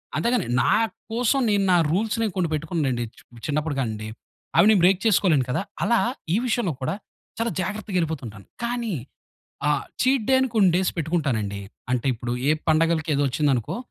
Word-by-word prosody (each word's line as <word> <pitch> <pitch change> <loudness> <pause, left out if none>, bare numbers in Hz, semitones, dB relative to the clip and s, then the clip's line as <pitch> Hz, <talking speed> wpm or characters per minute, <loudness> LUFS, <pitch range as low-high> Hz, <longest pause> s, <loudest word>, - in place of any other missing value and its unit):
అంతేగాని 235 -4 +1
నా - - +3 0.4
కోసం 245 +4 +2
నేను 200 -1 +2
నా 175 - +6
రూల్స్‌ని 220 +4 0
కొన్ని 170 -3 +1
పెట్టుకున్నానండి. 145 -6 -1
చు - - -17 0.3
చిన్నప్పుడు 150 0 -1
కాడినుండి. 110 -2 -3 0.5
అవి - - +7
నేను 200 - +4
బ్రేక్ 190 0 +4
చేసుకోలేను 170 - +3
కదా! 130 - 0 0.2
అలా 235 +3 +3 0.3
ఈ - - +3
విషయంలో 215 - 0
కూడా 190 - -1 0.4
చాలా 230 0 -1
జాగ్రత్తగా 205 0 -3
వెళ్ళిపోతుంటాను. 130 - -4 0.2
కానీ 235 -4 -2 0.7
ఆ - - +3 0.3
చీట్ 260 -3 +2
డే - - +6 0.2
కొన్ని 195 -4 +6
డేస్ 190 - +1
పెట్టుకుంటానండి. 135 - -1 0.3
అంటే 125 +1 0
ఇప్పుడు 120 +1 -4 0.2
ఏ - - +5 0.2
పండగలకి 160 0 +2
ఏదో 145 - +1
వచ్చింది 145 +3 +1
అనుకో, 120 - -3
170 Hz, 160 wpm, -24 LUFS, 140-215 Hz, 0.7 s, అవి